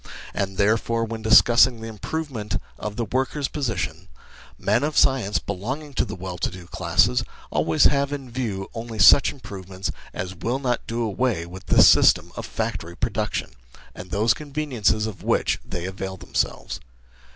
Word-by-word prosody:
And 95 -1 -2
therefore, 115 +3 +2
when 115 0 -6
discussing 120 +2 +6
the 115 - -7
improvement 110 - -4 0.2
of 105 -1 -5
the 115 0 -2
workers' 130 +5 -1
position, 95 - -3 0.5
men - - +1
of 150 +1 -1
science, 125 -7 +3
belong 105 +10 -4
ing 145 -2 -12
to - - +1
the - - -6
well 90 -1 -6
to - - 0
do 90 -2 -10
classes, 60 -6 +2 0.3
always 80 +2 +2
have 140 0 +3
in 135 -4 -6
view 110 -6 -3
only 115 -1 -6
such 105 +8 +7
improvements 95 -6 -6 0.2
as 90 +1 -5
will 115 +8 -2
not 125 -3 -2
do 115 +1 -2
away 110 -4 0
with 90 +2 -11
this - - +7
system - - +5
of - - -6
factory 85 +1 -4
production, - - -2 0.4
and 90 - -10
those 110 +5 +3
conveniences 135 -7 -1
of 110 -3 -6
which - - +1
they 90 -1 -5
avail 95 0 -5
themselves. - - -2
110 Hz, 160 wpm, -24 LUFS, 95-130 Hz, 0.5 s, such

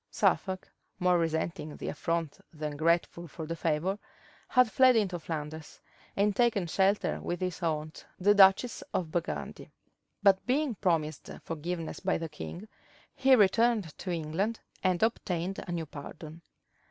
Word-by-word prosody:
Suffolk, 185 -1 0 0.3
more 180 -1 +3
resenting 160 -1 -2
the - - -6
affront 165 -1 -2
than 150 -2 -5
grateful 170 +2 +1
for 160 +1 -7
the 165 +2 -4
favor, 165 +5 -1 0.5
had 250 -3 +4
fled 255 -1 +6
into 190 -6 +1
Flanders, 155 -1 -6 0.4
and 200 0 +2
taken 230 -6 +2
shelter 195 +4 +1
with 175 - -3
his 185 0 -3
aunt, 155 -2 -2 0.2
the 205 +3 +5
duchess 200 +4 +5
of 165 -4 -1
Burgundy; 170 0 -4 0.5
but 195 -2 +5
being 275 +1 +1
promised 160 -7 -1
forgiveness 165 +1 -4
by - - 0
the 165 0 -5
king, 175 +6 -8 0.5
he 265 0 +5
returned 220 -4 +3
to 185 - -5
England, 175 +7 -1 0.2
and 185 +1 +2
obtained 190 -4 -1
a - - -4
new 170 -2 -2
pardon. 155 +2 -9
175 Hz, 140 wpm, -30 LUFS, 160-200 Hz, 0.5 s, fled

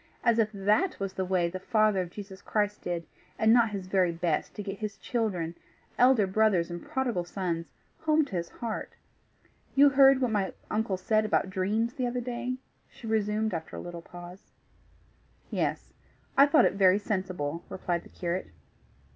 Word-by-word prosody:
As 235 -1 +3
if 220 -1 +3
THAT 210 - +1
was 195 -1 -3
the 190 - -2
way 180 -2 +1
the 185 +2 -5
Father 215 -1 +2
of 180 - -5
Jesus 195 0 -9
Christ 210 -1 -1
did, 170 -1 -3 0.3
and 220 +1 +5
not 235 -2 +5
his 200 -3 -5
very 185 -2 +2
best 165 -2 -1
to 205 - -5
get 195 0 -6
his 210 -2 -4
children, 190 -9 -2 0.4
elder 250 -4 +5
brothers 190 -3 +2
and 175 0 -6
prodigal 245 -9 -1
sons, 175 -2 -3 0.3
home 310 -1 +3
to 210 - -7
his 170 -1 -2
heart! 230 -2 -5 0.8
You 285 +1 +7
heard 270 -1 +6
what 250 -3 +1
my 200 -3 0 0.2
uncle 215 -3 0
said 215 +4 +2
about 205 -2 +1
dreams 210 +6 0
the 255 -2 -1
other 245 +1 -2
day?" 245 +1 -3 0.3
she - - -14
resumed 215 -1 0
after 160 -1 -5
a - - -5
little 175 -1 -7
pause. 175 +2 -12 1.0
"Yes. - - -2 0.4
I 280 +1 +7
thought 300 +1 +5
it - - +2
very 190 -1 +5
sensible," 185 -6 -3
replied 175 -2 -2
the - - -16
curate. 175 +1 -3
200 Hz, 175 wpm, -28 LUFS, 180-225 Hz, 1.0 s, You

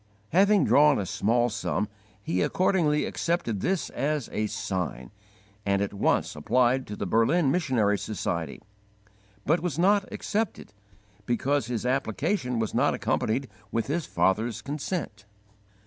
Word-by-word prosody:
Having 200 +3 +4
drawn 150 0 +5
a 100 - -2
small 110 +6 +1
sum, 105 -1 -1 0.4
he 90 -1 0
accordingly 165 - +2
accepted 165 - -1
this 185 - -1
as 145 -2 -2
a 105 0 -1
'sign,' 95 - -4 0.5
and 100 -1 +1
at 100 0 -2
once 100 - +1
applied 125 - +2
to 105 - -5
the 100 - -4
Berlin 135 - +3
Missionary 120 - +1
Society, 85 -7 -3 0.9
but 165 +4 +3
was 170 -5 -3
not 195 +3 +3
accepted 215 - -3 0.5
because 130 +1 0
his 120 -2 -3
application 125 - 0
was 110 -2 -1
not - - +2
accompanied 130 +5 -1 0.2
with 115 -1 0
his 155 +5 -2
father's 110 +4 0
consent. 145 - -4
125 Hz, 130 wpm, -27 LUFS, 105-155 Hz, 0.9 s, drawn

